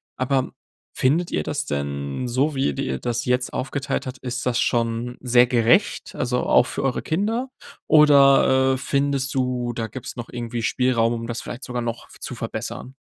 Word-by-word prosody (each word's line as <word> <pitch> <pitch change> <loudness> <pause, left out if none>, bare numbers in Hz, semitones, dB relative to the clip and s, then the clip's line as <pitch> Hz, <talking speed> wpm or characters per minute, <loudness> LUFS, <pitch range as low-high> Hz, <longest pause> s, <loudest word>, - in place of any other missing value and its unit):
aber 130 0 0 0.4
findet 160 +7 +1
ihr 75 - -1
das - - -3
denn, 70 - -3
so, 135 +5 0
wie 135 - +1
ihr 70 - 0
dir 65 0 -2
das 120 -1 -2
jetzt 125 0 0
aufgeteilt 135 +1 -3
habt, 130 - -6
ist 125 -1 -4
das 120 -2 +1
schon 120 +1 0
sehr 125 -1 +5
gerecht, 125 - +2
also, 125 -1 0
auch 120 - +4
für - - -4
eure 135 -2 0
Kinder? 225 +10 -1 0.4
Oder, 140 -3 +6
äh, - - -3
findest 140 0 -1
du, 125 -2 -1
da 115 -1 -3
gibt's 130 +4 -8
noch 120 -1 -7
irgendwie 120 -1 -4
Spielraum, 120 -1 +2
um 115 0 -4
das 120 0 -4
vielleicht 120 - -7
sogar 125 -1 -3
noch 115 0 -5
v - - -15
zu - - -5
verbessern? 130 - -6
125 Hz, 185 wpm, -23 LUFS, 120-135 Hz, 0.4 s, Oder